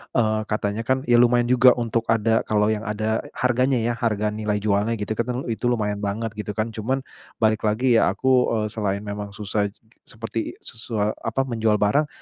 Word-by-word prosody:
eee, 110 -3 +2
katanya 105 +1 -2
kan, 130 +1 +1
ya 120 -3 +4
lumayan 120 0 +4
juga 125 0 +6
untuk 115 -1 -1
ada, 115 0 +2
kalau 105 0 +2
yang 110 0 -3
ada 110 +1 -1 0.2
harganya 125 +1 +2
ya, 120 - +1
harga 105 -2 0
nilai 105 -1 -2
jualnya 105 +2 +1
gitu 105 0 -5
kan, 115 +2 -1
telu 125 +1 -2
itu 120 +2 -2
lumayan 105 -4 0
banget 105 +2 -3
gitu 105 -1 -4
kan. 110 +2 -1
Cuman 130 +5 -2 0.3
balik 110 -1 +2
lagi, 115 +2 +3
ya - - +3
aku, 125 -4 +2
eee, - - -1
selain 100 -2 -2
memang 100 -1 -6
susah 105 0 -1 0.4
seperti 115 0 -5
susa 110 -2 -2
apa, 115 +4 -1
menjual 115 -4 +1
barang, 105 +9 +2
110 Hz, 185 wpm, -23 LUFS, 105-120 Hz, 0.4 s, juga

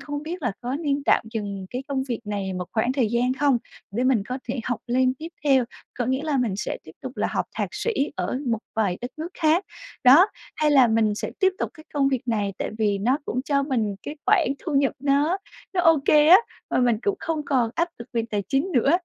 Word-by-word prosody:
không 290 0 -5
biết 335 +3 -6
là 245 -5 0
có 250 +3 -2
nên 285 -2 -1
tạm - - +3
dừng 200 -3 -4
cái 250 +2 -4
công 270 -2 0
việc 235 - -2
này 200 -2 -3
một 180 -1 -3
khoảng 235 +3 +1
thời 260 -5 +1
gian 245 +2 +2
không 275 -2 +3 0.4
để 245 - +1
mình 255 -5 +3
có 255 - -3
thể 250 0 -2
học 245 - -2
lên 255 +1 +2
tiếp 315 +5 -8 0.2
theo. 270 -4 +4 0.3
Có 245 - 0
nghĩa 260 +2 0
là 305 -3 0
mình 225 -6 0
sẽ 200 - -3
tiếp 155 - -12
tục 260 0 -7
là - - +1
học - - -1
thạc - - -1
sĩ 470 - -1 0.2
ở 255 - -2
một 230 -2 +1 0.2
vài 200 -5 +1
đất 245 +2 -5
nước 320 +2 -4
khác, 330 +3 +3 0.4
đó. 280 +9 +8 0.3
Hay 305 -1 +2
là 270 -4 +6
mình 220 -2 +2
sẽ - - -4
tiếp 380 0 +4
tục - - -2
cái 310 - -14
công 275 -2 +3
việc 265 -2 -1
này, 205 -3 0
tại - - -2
vì 205 -2 +1
nó 250 +8 +1
cũng 255 - -2
cho 280 -2 +1
mình 230 -8 -1
cái 295 - -6
khoản - - +4
thu 315 -5 -4
nhập 275 0 +3
nó 285 +5 +2 0.4
nó 360 - +3
ô 325 -3 +5
kê 300 -1 +5
á, 355 - +11 0.3
mà - - +1
mình 240 -2 +3
cũng 400 -1 0
không 315 -2 -2
còn 250 -5 +1
áp 340 +1 +1
lực 235 - -9
về 230 -1 0
tài 205 -1 -1
chính 280 +6 +1
nữa. 265 0 +3
260 Hz, 245 wpm, -24 LUFS, 230-295 Hz, 0.4 s, á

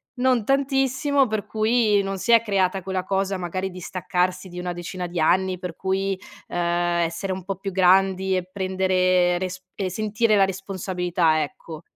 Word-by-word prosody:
non 250 -2 +2
tantissimo, 270 +1 +2
per 215 -2 -2
cui 215 -1 +2
non 195 0 -3
si 235 +5 +2
è 230 - +7
creata 195 -3 0
quella 190 0 -2
cosa, 195 0 0
magari, 185 +2 -3
di 180 - -9
staccarsi 185 +1 -2
di 180 0 -8
una 180 0 -3
decina 175 +1 -5
di 175 -1 -3
anni, 185 +3 +2
per 180 -1 -6
cui, 190 0 -1 0.3
ehm, - - -4 0.5
essere 180 +4 -4
un 185 -1 -5
po' 195 0 -3
più 195 +1 -5
grandi 190 +1 +3
e 185 0 -3
prendere 185 -2 +2
resp 185 0 -5
e 195 -2 -2
sentire 215 +3 +1
la 200 - +5
responsabilità, 180 -4 0
ecco. 155 +2 -7
190 Hz, 170 wpm, -23 LUFS, 180-200 Hz, 0.5 s, è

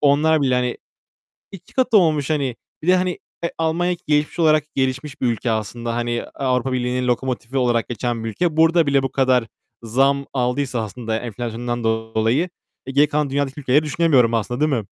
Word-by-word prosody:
onlar 150 +2 +3
bile, 130 -2 +2
hani, 125 -1 0 0.8
2 195 -3 -13
katı 255 -4 +3
olmuş, 155 -7 +2
hani. 140 -6 0 0.3
Bir 160 - -7
de, 185 - +6
hani, 180 -1 -1 0.2
e, 170 - -1
Almanya 170 +2 0
gelişmiş 150 +2 +1
olarak, 155 -2 +4
gelişmiş 135 +1 -2
bir 125 - +2
ülke 115 0 -1
aslında. 115 +2 -3
Hani, 120 0 -1
Avrupa 130 -1 0
Birliği'nin 125 0 -1
lokomotifi 125 +1 -2
olarak 120 -3 +1
geçen 120 -1 -2
bir 115 - -2
ülke. 160 - -1
Burada 165 0 +4
bile 140 -1 +3
bu 135 - -2
kadar 130 -3 +2 0.4
zam 135 +4 +2
aldıysa 125 -1 -1
aslında 110 +1 -4
enflasyondan 120 +1 -4
dolayı, 110 +7 0 0.4
e, 135 - -5
geri 145 +2 +4
kalan 150 -1 0
dünyadaki 140 0 -2
ülkeleri 140 +2 +3
düşünemiyorum 145 -6 +3
aslında, 115 +2 -1
değil 155 0 +2
mi? 130 - +2
130 Hz, 175 wpm, -21 LUFS, 120-150 Hz, 0.8 s, de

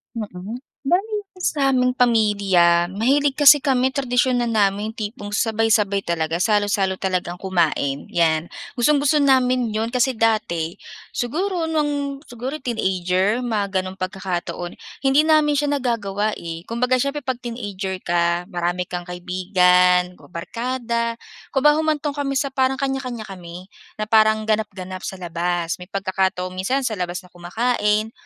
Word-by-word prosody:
Mm. 210 +2 -6 0.2
Bale 410 +8 0 0.2
sa 280 -6 +1
aming 250 -1 +2
pamilya 200 -7 +3
mahilig 270 +8 +2
kasi 290 0 +9
kami 260 -2 +2
tradisyon 255 -1 +1
na - - 0
namin 210 -1 +1
tipong 210 -1 -6
sabay-sabay 215 -2 +1
talaga, 165 -1 -1
salo-salo 205 -2 +1
talagang 180 -2 -2
kumain 165 -7 0
'yan. 165 -1 +1 0.3
Gustong-gusto 290 +4 +3
namin 255 -3 +3
'yon 220 +1 -1
kasi 250 +1 +2
dati 215 -8 0 0.4
siguro 340 +8 -1
nung 285 -3 -1
siguro 255 +5 -5
teenager 190 -3 0
mga 205 -5 -1
gano'ng 185 0 -5
pagkakataon, 185 -2 -4 0.3
hindi 275 +3 +5
namin 305 -2 +4
siya 290 0 +1
nagagawa 215 -6 -1
eh. 165 -1 -6
Kumbaga 250 +2 +1
siyempre 280 +2 -2
'pag 255 -2 -2
teenager 205 -5 -4
ka, 170 0 +1
marami 175 +1 -1
kang 175 0 -6
kaibigan 180 0 +3
o - - -16
barkada. 235 +5 -3 0.3
Kumbaga 295 +3 +3
humantong 305 -2 0
kami 280 -1 -2
sa 275 +1 -1
parang 265 0 +2
kanya-kanya 265 -4 -3
kami, 180 -2 -9 0.3
na 215 - -2
parang 215 0 +4
ganap-ganap 190 -4 -2
sa - - -5
labas. 175 -1 -2
May 180 - -10
pagkakataon 190 -2 -1
minsan 225 +10 -1
sa 230 - 0
labas 180 +1 -3
na 180 - -18
kumakain 210 +4 0
215 Hz, 135 wpm, -21 LUFS, 180-255 Hz, 0.4 s, kasi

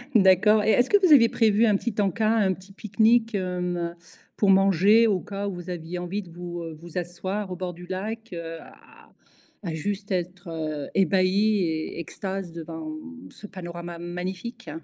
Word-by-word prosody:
D'accord 210 +2 +5
et 220 - +1
est-ce 245 - +3
que 410 - +6
vous 335 - +4
aviez 230 -5 +7
prévu 225 0 +3
un 210 - +4
petit 220 +2 -2
en-cas, 215 +2 +1
un 195 -4 +3
petit 190 +2 -14
pique-nique, 220 +3 +2
hem, 180 -2 -2 0.4
pour 200 - +3
manger 195 +4 +5
au 195 -4 +2
cas 200 +2 -5
où 195 - -3
vous 175 0 -8
aviez 175 0 -5
envie 185 +4 -3
de 180 - -14
vous, 175 0 -7
heu, 165 -1 -6
vous 170 +1 -9
asseoir 185 +3 -3
au - - -3
bord 180 -1 -4
du 175 +1 -11
lac, 215 +4 -5
heu, 165 -1 -6
à - - -17 0.5
à 165 -3 -3
juste 200 +5 -4
être, 180 -1 -3
heu, 155 -3 -4
ébahi 195 +3 +3
et 160 -1 -2
extase 190 +1 -5
devant 160 -1 -6 0.4
ce 210 - -11
panorama 175 -2 -7
magnifique? 180 +3 -6
185 Hz, 180 wpm, -25 LUFS, 175-205 Hz, 0.5 s, aviez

